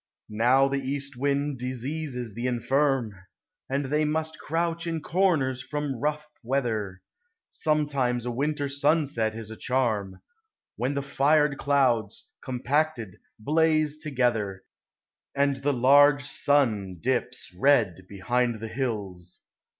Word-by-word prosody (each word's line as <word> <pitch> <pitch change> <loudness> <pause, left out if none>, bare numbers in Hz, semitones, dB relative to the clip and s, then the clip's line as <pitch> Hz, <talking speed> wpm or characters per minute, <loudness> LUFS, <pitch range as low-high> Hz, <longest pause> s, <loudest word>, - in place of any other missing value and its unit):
Now 125 +5 +4
the 140 0 -1
east 140 +1 -4
wind 140 +1 -1
diseases 130 -1 -4
the 120 +4 -3
infirm, 125 -1 +1 0.6
And 135 +1 -1
they 150 +3 +1
must 160 +1 -2
crouch 170 +1 -2
in 165 -1 -2
corners 155 -7 +1
from 145 +1 -3
rough 150 +2 -1 0.2
weather; 110 -7 -2 0.5
Sometimes 140 -6 0
a 125 - -2
winter 145 +3 -1
sunset 140 -6 +1
is 110 -1 -7
a - - -7
charm 110 -7 -1 0.5
When 130 +4 -2
the 140 - -1
fired 145 +1 +2
clouds, 125 -7 +1
compacted, 130 - -1 0.2
blaze 155 +3 +1
together, 120 - -1 0.7
And 140 -1 +2
the 140 +2 0
large 140 +3 +5
sun 120 -10 +1
dips 125 -1 -2
red 100 -6 +2
behind 120 +4 -1
the 115 +1 -6
hills. 100 -9 -4
135 Hz, 120 wpm, -26 LUFS, 115-145 Hz, 0.7 s, large